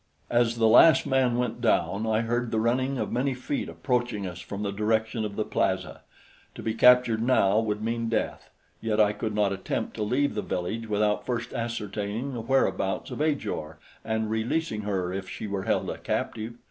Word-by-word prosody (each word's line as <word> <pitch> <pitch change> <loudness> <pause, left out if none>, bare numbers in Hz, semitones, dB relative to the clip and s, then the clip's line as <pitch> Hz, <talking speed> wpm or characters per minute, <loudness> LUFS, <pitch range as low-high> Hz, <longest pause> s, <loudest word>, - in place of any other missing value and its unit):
As 120 -1 +3
the 115 -1 +4
last 135 +6 +7
man 130 -3 +2
went 120 -1 -2
down, 100 -2 +1
I 110 0 +2
heard 120 +1 -1
the 110 - 0
running 130 +4 +1
of - - -2
many 130 +2 0
feet 130 +3 -3
approaching 120 -6 -1
us 90 -1 -6
from 100 +3 -6
the 100 - -1
direction 110 +2 0
of 105 -1 -4
the 110 - -1
plaza. - - -1 0.5
To - - -8
be 110 - -1
captured 125 -1 +5
now 110 -4 +3
would 105 -1 -2
mean 115 0 -1
death; 115 - -2 0.3
yet 110 -1 0
I 105 -1 +4
could 105 0 -3
not 105 -2 +2
attempt 95 -1 -3
to - - -3
leave 130 +7 +1
the 105 - -2
village 110 +7 -3
without 105 0 +1
first 120 -1 -3
ascertaining 115 +1 -3
the 120 - -4
whereabouts 115 -5 0
of - - -4
Ajor 85 - -2 0.3
and 110 -1 -1
releasing 110 +2 -1
her 95 -3 -2
if 95 0 -5
she - - -6
were 100 -2 -3
held - - 0
a - - -4
captive. 115 +1 -3
110 Hz, 190 wpm, -27 LUFS, 105-120 Hz, 0.5 s, last